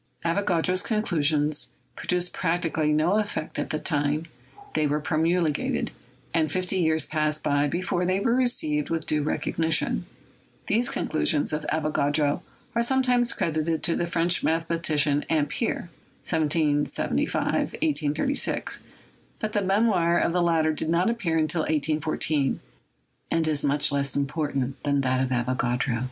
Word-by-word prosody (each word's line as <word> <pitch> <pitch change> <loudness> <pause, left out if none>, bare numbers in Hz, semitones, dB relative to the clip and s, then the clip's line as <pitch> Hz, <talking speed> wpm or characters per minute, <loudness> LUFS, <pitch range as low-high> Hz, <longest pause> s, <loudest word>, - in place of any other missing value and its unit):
Avogadro's 180 0 +1
conclusions 155 -8 +1 0.3
produced 180 0 -1
practically 165 -3 0
no 160 +7 +2
effect 205 -7 -3
at - - -2
the 155 - -1
time 150 0 0 0.5
they 155 -1 +2
were 150 +1 0
promulgated, 160 +1 0 0.4
and 155 -3 +1
fifty 185 +1 0
years 160 -3 +2
passed 155 -1 0
by 145 0 +2
before 175 +3 -1
they 185 +2 +1
were 230 +4 +1
received 155 - +1
with 165 -1 -2
due 155 -1 +1
recognition. 155 - 0 0.6
These 240 +5 +1
conclusions 155 - 0
of 150 0 -3
Avogadro 150 -1 +1 0.3
are 235 - +2
sometimes 250 -1 +2
credited 160 0 -1
to 170 - +1
the 175 - -1
French 170 0 +1
mathematician 160 -3 +1
Ampere 160 - -1 0.3
(1775 150 -2 +1
1836), 275 - -1 0.6
but 215 -1 -4
the 205 - +2
mem 200 +4 +2
oir 175 -5 +2
of 170 - +1
the 180 - +2
latter 165 -2 +2
did 155 - -3
not 175 +6 +2
appear 190 -9 -1
until 160 +1 +1
1814, 155 -2 0 0.7
and 165 -1 +1
is 150 -2 +2
much 145 0 +1
less 140 -1 -1
important 140 -2 -2
than 140 -1 +1
that 130 -1 +1
of 130 - -1
Avogadro. 125 -1 0
160 Hz, 135 wpm, -26 LUFS, 150-175 Hz, 0.7 s, no